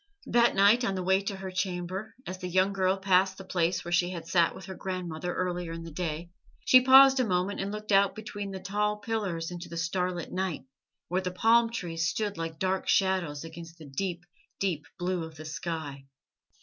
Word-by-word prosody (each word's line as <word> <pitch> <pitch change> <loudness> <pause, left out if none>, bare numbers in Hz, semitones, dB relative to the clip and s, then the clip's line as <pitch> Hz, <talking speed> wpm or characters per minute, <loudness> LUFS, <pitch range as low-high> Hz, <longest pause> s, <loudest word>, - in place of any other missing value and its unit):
That 235 0 +3
night 205 +5 +5
on 195 -4 0
the 185 - -2
way 190 +1 +3
to 200 0 -4
her 190 -1 -6
chamber, 185 +2 -3
as 185 0 -6
the 180 - -4
young 185 +2 +2
girl 190 0 +1
passed 190 0 +2
the 195 - -8
place 180 -1 0
where 175 - -5
she 175 0 +2
had 170 -3 -6
sat 170 -1 +2
with 190 - -10
her 190 - -7
grandmother 180 -3 -4
earlier 175 -2 -2
in 165 0 -6
the 165 - -8
day, 170 +1 -4 0.3
she 255 - +8
paused 265 +1 +8
a - - +4
moment 190 -1 0
and 195 +1 -2
looked 215 0 -6
out 200 0 +4
between 205 -2 -6
the 190 -1 -6
tall 210 +3 -1
pillars 200 -6 -3
into 175 0 -7
the 170 - -6
starlit 180 +1 -2
night, 185 -7 -3 0.4
where 180 +2 0
the 185 - -2
palm 230 +5 +4
trees 165 -7 -2
stood 205 +3 -2
like 165 -1 -5
dark 190 +2 -1
shadows 185 -7 +1
against 165 0 -10
the 160 - -12
deep, 175 +5 -4 0.3
deep 175 -7 -1
blue 180 -1 -1
of 160 -1 -9
the 155 0 -10
sky. 155 -3 -5
185 Hz, 205 wpm, -29 LUFS, 170-195 Hz, 0.4 s, she